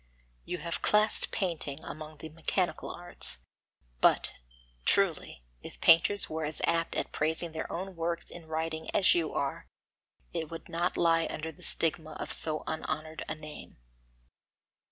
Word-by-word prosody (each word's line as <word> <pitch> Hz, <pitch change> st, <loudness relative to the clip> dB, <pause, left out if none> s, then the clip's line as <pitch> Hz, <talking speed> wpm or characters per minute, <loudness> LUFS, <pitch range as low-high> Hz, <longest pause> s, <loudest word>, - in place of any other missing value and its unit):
You 180 Hz, -, -3 dB
have 170 Hz, +1 st, -3 dB
classed 210 Hz, 0 st, +4 dB
painting 160 Hz, -6 st, -2 dB
among 155 Hz, 0 st, -8 dB
the 160 Hz, -, -8 dB
mechanical 165 Hz, +1 st, -1 dB
arts, 175 Hz, -, 0 dB, 0.5 s
but, -, -, +4 dB, 0.5 s
truly, 165 Hz, -, +2 dB, 0.2 s
if -, -, -11 dB
painters 175 Hz, +5 st, +6 dB
were 160 Hz, 0 st, -3 dB
as 150 Hz, 0 st, 0 dB
apt 165 Hz, 0 st, +1 dB
at -, -, -1 dB
praising 160 Hz, +2 st, -1 dB
their 160 Hz, 0 st, -5 dB
own 185 Hz, +2 st, -5 dB
works 170 Hz, 0 st, -2 dB
in 165 Hz, -2 st, -10 dB
writing 160 Hz, 0 st, -3 dB
as 190 Hz, -, +6 dB
you 165 Hz, -2 st, 0 dB
are, 140 Hz, -1 st, -3 dB, 0.7 s
it 160 Hz, -2 st, -3 dB
would 165 Hz, -1 st, -8 dB
not 175 Hz, +2 st, -1 dB
lie 165 Hz, -1 st, +3 dB
under 160 Hz, +1 st, -4 dB
the 150 Hz, -, -19 dB
stigma 160 Hz, -1 st, +2 dB
of -, -, -3 dB
so 155 Hz, -1 st, +2 dB
unhonoured 155 Hz, 0 st, -4 dB
an 155 Hz, -, -5 dB
name. 150 Hz, 0 st, -10 dB
160 Hz, 150 wpm, -30 LUFS, 155-170 Hz, 0.7 s, painters